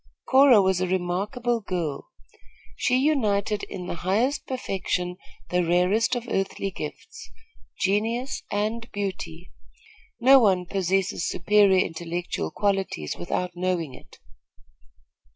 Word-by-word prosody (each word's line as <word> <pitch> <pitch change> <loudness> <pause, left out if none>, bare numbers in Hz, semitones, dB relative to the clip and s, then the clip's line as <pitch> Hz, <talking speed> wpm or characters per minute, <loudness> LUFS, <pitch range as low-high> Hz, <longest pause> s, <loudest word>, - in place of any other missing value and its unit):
Cora 260 -6 +6
was 190 -1 +1
a 185 - +1
remarkable 200 +7 -1
girl. 170 - -4 0.7
She 250 - +1
united 215 -8 +1
in 185 -3 -7
the - - -4
highest 240 +10 0
perfection 180 -7 -2 0.3
the 180 0 +2
rarest 180 +8 +2
of 245 0 -4
earthly 195 0 -2
gifts 445 - -8 0.5
genius 225 +6 0
and 220 +3 -2
beauty. 185 -4 -5 0.7
No 265 +3 +7
one 190 -6 +3
possesses 190 -1 0
superior 195 0 +4
intellectual 170 - -4
qualities 195 - -1
without 180 - -3
knowing 175 -5 -2
it. - - -15
195 Hz, 110 wpm, -25 LUFS, 180-230 Hz, 0.7 s, No